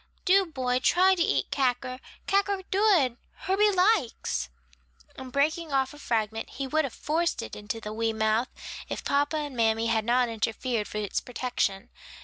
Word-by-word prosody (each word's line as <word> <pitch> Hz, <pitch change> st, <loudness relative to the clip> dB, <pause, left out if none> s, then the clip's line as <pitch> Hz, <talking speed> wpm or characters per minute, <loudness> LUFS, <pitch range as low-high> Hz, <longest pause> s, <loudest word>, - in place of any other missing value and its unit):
Do, 385 Hz, 0 st, +4 dB
boy, 255 Hz, -5 st, -1 dB
try 370 Hz, +7 st, +4 dB
to 360 Hz, -, -1 dB
eat -, -, +1 dB
cacker, 255 Hz, -1 st, 0 dB, 0.3 s
cacker 395 Hz, -1 st, +1 dB
dood, 375 Hz, -, +3 dB, 0.2 s
Herbie 405 Hz, +3 st, +3 dB
likes," 365 Hz, -, +1 dB, 0.7 s
and 260 Hz, -1 st, -9 dB
breaking 310 Hz, +3 st, 0 dB
off 270 Hz, 0 st, +1 dB
a 295 Hz, -, -13 dB
fragment 225 Hz, -3 st, -2 dB
he 275 Hz, -, -5 dB
would 310 Hz, +3 st, +1 dB
have 265 Hz, -, -6 dB
forced 330 Hz, +3 st, -1 dB
it -, -, -7 dB
into 210 Hz, +2 st, -5 dB
the 210 Hz, -1 st, -6 dB
wee 225 Hz, 0 st, 0 dB
mouth, 220 Hz, +3 st, +1 dB, 0.4 s
if -, -, -4 dB
papa 290 Hz, +2 st, +1 dB
and 290 Hz, -3 st, -4 dB
mammy 225 Hz, -1 st, +2 dB
had 225 Hz, -1 st, +1 dB
not 245 Hz, +2 st, +2 dB
interfered 225 Hz, 0 st, -2 dB
for -, -, -6 dB
its 210 Hz, -2 st, -2 dB
protection. 245 Hz, -6 st, -2 dB
255 Hz, 165 wpm, -27 LUFS, 225-330 Hz, 0.7 s, Do